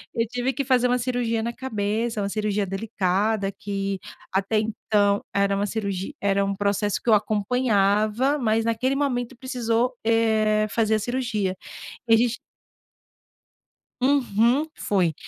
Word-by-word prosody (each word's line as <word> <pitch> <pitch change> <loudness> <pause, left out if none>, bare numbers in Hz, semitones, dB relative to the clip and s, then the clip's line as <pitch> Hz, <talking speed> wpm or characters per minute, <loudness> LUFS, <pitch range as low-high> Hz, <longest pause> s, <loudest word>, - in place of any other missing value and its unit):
Eu 230 - +1
tive 245 +2 -1
que 280 - -2
fazer 250 -1 +3
uma 250 0 +2
cirurgia 240 -2 -1
na 235 +1 -3
cabeça, 220 -2 -2
uma 200 - -1
cirurgia 210 -1 -1
delicada. 195 +1 -1
Que, 195 -1 -4 0.3
até 195 +3 +1
então, 210 -2 +1
era 200 0 +2
uma 205 +1 0
cirurgi 200 +3 -3
era 200 0 +1
um 195 0 -1
processo 205 +1 0
que - - -2
eu 220 - +7
acompanhava. 215 +4 +2
Mas, 225 -2 +1
naquele 255 +4 0
momento 255 -3 -1
precisou, 245 -1 -1
eh, 220 -2 +2
fazer 220 0 +1
a - - +1
cirurgia. 220 -5 -2 0.5
E 225 - +5
a - - +4
gente 235 0 +1 1.6
Uhum, 255 +1 +2
foi. 180 -5 +1
220 Hz, 140 wpm, -24 LUFS, 200-245 Hz, 1.6 s, eu